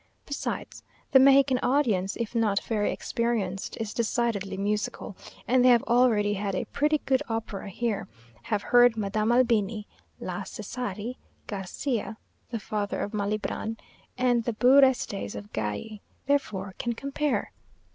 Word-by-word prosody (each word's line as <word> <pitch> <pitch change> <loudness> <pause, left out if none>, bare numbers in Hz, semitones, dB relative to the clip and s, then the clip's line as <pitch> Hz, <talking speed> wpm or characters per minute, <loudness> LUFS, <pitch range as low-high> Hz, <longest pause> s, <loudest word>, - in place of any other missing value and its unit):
Besides, 285 - -4 0.3
the 265 - +8
Mexican 270 -1 +6
audience, 235 -9 +1
if 235 -1 -4
not 215 -4 +2
very 215 -2 0
experienced, 220 -6 -2
is 220 -2 -3
decidedly 225 -4 -1
musical; 205 0 -2 0.3
and 250 0 +4
they 255 - +7
have 240 -2 +5
already 230 -4 +3
had 200 -1 -2
a - - -2
pretty 300 +1 +1
good 265 -1 +2
opera 220 -3 -4
here, 215 0 -2 0.3
have 205 - -2
heard 245 -2 +5
Madame 215 +2 0
Albini, 230 -4 +2 0.3
la - - -4
Cesari, 245 -1 -5 0.3
Garcia 215 +3 -3 0.3
(the 230 - -3
father 205 -1 -3
of 205 - -4
Malibran) 215 +2 -2 0.4
and 245 -2 +2
the 235 - 0
beux 255 +5 +6
restes 225 - +1
of 100 0 -9
Galli; 110 - -4 0.2
therefore 260 -9 -1
can 240 - -1
compare. 280 +4 -2
225 Hz, 135 wpm, -27 LUFS, 205-250 Hz, 0.4 s, the